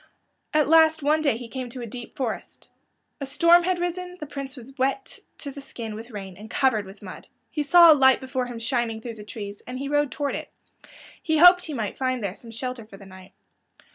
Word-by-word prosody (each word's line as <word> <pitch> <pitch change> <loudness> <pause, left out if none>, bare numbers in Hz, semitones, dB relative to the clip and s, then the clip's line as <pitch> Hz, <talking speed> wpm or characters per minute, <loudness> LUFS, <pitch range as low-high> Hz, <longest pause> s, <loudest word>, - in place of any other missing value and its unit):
At 305 -1 +3
last 320 -1 +5
one 305 +2 +3
day 280 -7 +1
he 240 0 -8
came 250 +2 -6
to 250 +1 -8
a - - -4
deep 240 +1 -9
forest. 250 -5 -5 0.5
A 275 - -5
storm 335 +5 +5
had 365 -1 +1
risen; 360 +1 -4
the 300 - -5
Prince 275 -1 -7
was 260 +1 -12
wet 275 +10 -1 0.2
to 285 - -7
the 280 - -9
skin 230 -5 -7
with 225 +3 -9
rain, 195 -5 -8
and 215 +2 -11
covered 225 -6 +1
with 195 +2 -13
mud. 185 - -10 0.2
He 300 - -2
saw 340 +3 +8
a - - +10
light 265 -3 +5
before 260 -1 -3
him 245 -1 -7
shining 230 -1 -1
through 230 +1 -7
the 215 -2 -11
trees, 205 -1 -8
and 250 +1 -5
he 275 +1 -4
rode 290 -1 +1
toward 285 -2 -2
it. - - -5 0.7
He 315 -1 +1
hoped 355 +2 +7
he 305 - -5
might 215 -5 -4
find 255 -3 -1
there 195 -2 -2
some 230 +3 -13
shelter 250 +1 -5
for 195 - -13
the 195 - -14
night. 185 0 -14
260 Hz, 230 wpm, -25 LUFS, 225-300 Hz, 0.7 s, a